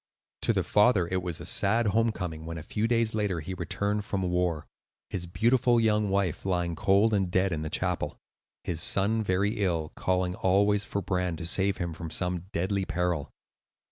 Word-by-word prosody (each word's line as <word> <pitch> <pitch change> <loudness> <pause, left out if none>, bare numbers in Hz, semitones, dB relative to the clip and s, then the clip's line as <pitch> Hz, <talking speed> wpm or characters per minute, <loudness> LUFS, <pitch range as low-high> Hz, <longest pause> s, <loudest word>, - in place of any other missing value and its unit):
To - - +4
the - - 0
father 105 -4 +3
it 95 0 0
was 85 -3 -4
a - - -8
sad 115 +4 +2
home 115 +3 +2
coming 80 -6 -5
when, 85 +1 -6
a 80 - -7
few 105 +7 -1
days 115 -1 +1
later, 105 -5 0
he 85 +5 -6
returned 100 +4 -2
from 100 -2 -2
war,—his 90 0 -4
beautiful 120 +6 +3
young 105 -2 +2
wife 95 -4 0
lying 90 -3 -1
cold 100 +6 +3
and 95 -3 +1
dead 95 +1 +1
in 80 -2 -2
the 80 - -3
chapel; - - -2 0.5
his 85 -2 -2
son 105 +6 +2
very 100 +3 0
ill, 85 -5 0
calling 90 -1 0
always 100 +2 +2
for 100 - -3
Bran 90 -2 -1
to 80 - -6
save 95 +3 +1
him 85 -2 -3
from 80 +1 -7
some 90 +1 -2
deadly 95 +3 -1
peril. 90 -5 -1
95 Hz, 185 wpm, -28 LUFS, 85-105 Hz, 0.5 s, To